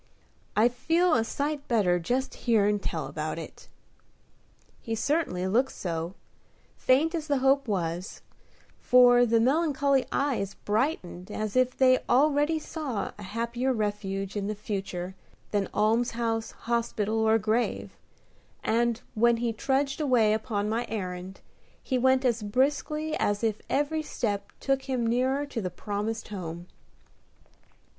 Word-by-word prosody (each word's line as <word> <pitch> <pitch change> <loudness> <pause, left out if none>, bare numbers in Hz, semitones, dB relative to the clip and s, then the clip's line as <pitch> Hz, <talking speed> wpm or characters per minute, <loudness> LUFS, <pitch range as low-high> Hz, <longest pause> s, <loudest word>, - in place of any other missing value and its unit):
I 215 +3 +5
feel 330 +8 +2
a 225 - +3
sight 285 +4 -3
better 190 -7 +2
just 250 +10 -1 0.2
hearin' 210 -2 +4
tell - - -3
about - - -4
it." - - -9 1.1
He 225 - -3
certainly 225 - 0
looked 235 +8 +1
so, 170 0 -4 0.6
faint 290 +6 +2
as 320 -2 -3
the 285 -2 +2
hope 270 +1 +3
was; 175 -2 -3 0.6
for 245 -1 +6
the 230 0 +3
melancholy 280 0 +2
eyes 250 -9 -1
brightened 205 - -2
as 215 0 -4
if 255 0 +2
they 255 -1 +5
already 295 +4 +3
saw 300 -8 -4
a - - -8
happier 235 +5 -2
refuge 205 -3 -3
in 200 -1 -2
the 215 - -2
future 195 -3 -4 0.4
than 200 -2 0
almshouse, 225 +1 0
hospital, 225 -2 -1
or 220 0 +4
grave, 225 +2 -1 0.7
and, 235 +1 +1
when 235 +1 +3
he 230 0 -1
trudged 275 +5 0
away 240 -7 +3
upon 215 -2 -1
my 225 +3 -1
errand, 185 -3 -5 0.4
he 260 -2 0
went 260 +1 +3
as 235 -2 +2
briskly 290 +7 0
as 205 +2 0
if 220 -2 0
every 295 +3 0
step 205 -9 -3
took 270 0 -1
him 250 -3 0
nearer 260 +5 +1
to 270 -5 -4
the 185 - -2
promised 210 +4 -4
home. 175 -4 -6
230 Hz, 135 wpm, -27 LUFS, 205-265 Hz, 1.1 s, for